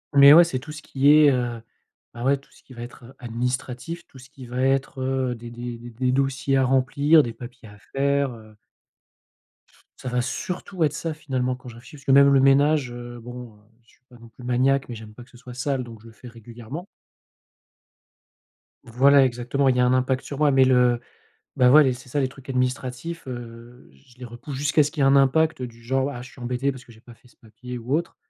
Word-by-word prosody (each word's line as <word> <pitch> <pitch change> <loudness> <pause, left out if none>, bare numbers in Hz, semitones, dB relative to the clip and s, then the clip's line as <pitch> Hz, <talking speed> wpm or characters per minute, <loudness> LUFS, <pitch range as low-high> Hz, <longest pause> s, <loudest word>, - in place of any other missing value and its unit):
mais 140 0 +9
ouais, 170 +3 +9
c'est 130 -6 -3
tout 150 +4 -10
ce 155 0 -9
qui 140 +1 +2
est, 150 -1 +7
heu, 120 -2 -2 0.5
bah, 120 - -8
ouais, 140 +2 +2
tout 140 - -23
ce - - -22
qui 130 - -16
va 120 -1 -8
être, 120 0 -12
heu, 125 - -14
administratif, 125 +6 -4
tout 135 - -16
ce 125 0 -15
qui 135 -2 -12
va 125 +1 -4
être, 135 0 0
heu, 130 -1 -1
des 120 0 -10
des 120 0 -7
des 120 +1 -11
des 125 +2 -1
dossiers 135 0 0
à 135 - +3
remplir, 140 +4 +3
des 115 - -5
papiers 120 -1 -12
à 105 - -15
faire, 140 0 0
heu 110 -2 -15 1.4
Ça 130 - -6
va 125 0 0
surtout 180 +7 -4
être 150 -2 +1
ça 165 +1 -4
finalement, 130 -4 -2
quand 125 0 -12
je 115 - -12
réfléchis, 120 +5 -14
parce 140 -1 -16
que, - - +1
même 140 +1 +7
le 135 - +5
ménage, 140 0 +3
heu, 120 0 -9
bon, 120 -1 -10
heu, 105 - -23 0.2
je 115 - -30
suis - - -30
pas 125 - -16
non 115 0 -15
plus 120 +2 -16
maniaque, 130 +2 +1
mais 120 - -6
j'aime 110 -1 -11
pas 120 - -12
que - - -22
ce 125 - -17
soit 125 0 -11
sale, 130 +1 -2
donc 115 -2 -12
je 115 - -15
le - - -13
fais 125 - -14
régulièrement. 120 - -10 2.0
Voilà, 135 +4 +4
exactement. 125 +3 -1
Il 130 - +2
y - - 0
a 125 - +4
un 125 - +2
impact 130 +1 0
sur 140 - -7
moi, 150 -1 +3
mais 135 -1 +5
le 125 -2 +3 0.6
bah 125 -1 +5
ouais, 145 -3 +6
c'est 125 +2 -11
ça 145 +3 -1
les 130 - 0
trucs 135 +1 -16
administratifs, 130 +5 -3
heu, 120 - -10
je 70 - -23
les 125 - -9
repousse 120 +4 -9
jusqu'à 145 +2 +2
ce 145 - -3
qu'il 150 - -5
y - - +5
ait - - +5
un 135 - +5
impact 140 +1 +2
du 115 -1 -9
genre: 135 +3 0
«Ah, 120 - -8
je 125 - -12
suis 125 - -16
embêté, 125 +3 -1
parce 130 -2 -10
que 120 - -16
j'ai 110 - -19
pas 120 +1 -15
fait 115 - -26
ce - - -26
papier 120 +3 -10
ou 120 +4 -3
autre», 170 +1 -4
130 Hz, 240 wpm, -23 LUFS, 120-140 Hz, 2.0 s, mais